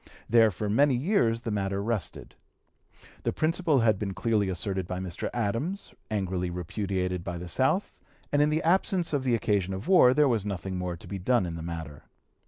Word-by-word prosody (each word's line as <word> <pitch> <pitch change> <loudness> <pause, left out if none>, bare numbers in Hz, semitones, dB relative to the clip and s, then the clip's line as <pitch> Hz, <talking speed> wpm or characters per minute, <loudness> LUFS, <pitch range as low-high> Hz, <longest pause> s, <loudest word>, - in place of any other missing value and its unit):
There 115 -1 +5
for 105 +2 -4
many 130 +6 +3
years 120 - +1
the 115 - -4
matter 100 -1 -1
rested. 115 -3 -3 0.9
The - - 0
principle 160 -3 +1
had 110 -4 +3
been 100 -3 -3
clearly 105 0 +1
asserted 95 0 -2
by 90 - -3
Mr. 95 -2 -4
Adams, 120 - -2 0.2
angrily 95 -4 -1
repudiated 90 0 -3
by 90 -2 -4
the 90 +1 -7
South, 130 - 0 0.3
and 145 - +3
in 150 - +4
the 155 +1 0
absence 175 0 +1
of 140 -2 +1
the 125 -3 +2
occasion 100 -4 0
of 95 - -7
war 150 -10 +6
there 150 -1 +5
was 115 -6 +1
nothing 95 -2 -4
more 90 -1 -3
to - - -14
be 100 - -5
done 120 +2 +2
in 85 - -4
the 80 - -6
matter. 80 -3 -7
105 Hz, 190 wpm, -28 LUFS, 90-130 Hz, 0.9 s, war